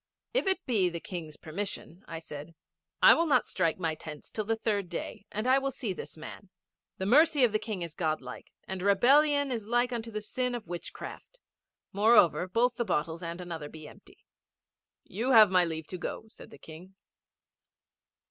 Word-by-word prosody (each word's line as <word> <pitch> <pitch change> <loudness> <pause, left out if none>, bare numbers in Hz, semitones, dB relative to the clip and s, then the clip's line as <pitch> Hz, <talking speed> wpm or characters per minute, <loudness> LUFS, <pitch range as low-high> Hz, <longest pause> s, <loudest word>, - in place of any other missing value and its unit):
'If - - +1
it 380 -1 0
be 205 -8 +2
the 170 -1 -5
King's 160 -4 -7
permission,' 180 +1 -6
I 165 - -6
said, 160 0 -9 0.5
'I - - +10
will 335 - +1
not 260 -5 +3
strike 165 - 0
my 165 -3 -1
tents 155 -1 -9
till 215 - -3
the 225 +2 +1
third 205 -4 -1
day 175 +3 -6
and 215 +2 -3
I 260 +1 +5
will 275 0 -1
see 245 -6 -4
this 175 - -9
man. 180 +5 -10 0.5
The 190 - -3
mercy 295 +5 +5
of 240 - +5
the 215 - +1
King 210 -6 -4
is 170 -2 -7
God 155 -3 -1
like, 125 -1 -10 0.2
and 190 -1 -4
rebellion 280 +8 +4
is 225 -4 -4
like 240 +1 +1
unto 230 -1 -4
the 215 -1 -4
sin 250 +4 -2
of 235 -7 -7
witchcraft. 175 - -8 0.5
Moreover, 205 -3 +4
both 235 +5 +1
the 240 - +1
bottles 165 -4 -2
and 170 0 -5
another 165 -4 -6
be 155 -1 -11
empty.' - - -18 0.8
'You 235 +8 -1
have 215 -4 +8
my 180 -1 +5
leave 160 -1 -4
to 185 - -6
go,' 200 - -5
said - - -14
the - - -13
King. 175 +4 -13
200 Hz, 190 wpm, -29 LUFS, 170-240 Hz, 0.8 s, I